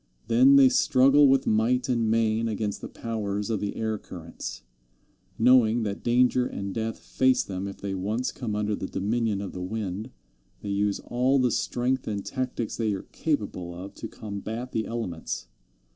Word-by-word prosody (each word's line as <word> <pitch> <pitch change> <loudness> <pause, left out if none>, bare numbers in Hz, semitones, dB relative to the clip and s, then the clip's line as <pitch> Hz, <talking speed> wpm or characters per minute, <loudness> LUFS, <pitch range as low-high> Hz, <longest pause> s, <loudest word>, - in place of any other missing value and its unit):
Then 130 +4 +6
they 135 -1 +8
struggle 135 +2 +5
with 135 0 +3
might 115 +3 +2
and 120 -3 +1
main 115 0 +2
against 105 -2 -2
the - - -5
powers 105 -2 -3
of 110 - 0
the 100 0 -3
air 110 -1 -2
currents. 85 -4 -8 0.7
Knowing 120 -1 +5
that 100 -1 -3
danger 125 +1 +3
and 100 -1 -5
death 115 0 -2
face 130 -1 +2
them 95 0 -4
if 100 - -7
they 100 -1 -4
once 105 +7 -1
come 115 -5 -4
under 105 0 0
the 95 - -5
dominion 105 0 -1
of 100 - -6
the 90 - -6
wind, 105 +2 -4 0.5
they 105 - -4
use 100 0 0
all 130 +3 +1
the 125 -2 +2
strength 125 +3 -1
and 100 -2 -3
tactics 125 -3 -3
they 110 -3 0
are 95 - -4
capable 100 - -2
of 95 +3 -8
to - - -7
combat 110 +4 -6
the 110 - -1
elements. 85 - -4
110 Hz, 175 wpm, -26 LUFS, 100-125 Hz, 0.7 s, they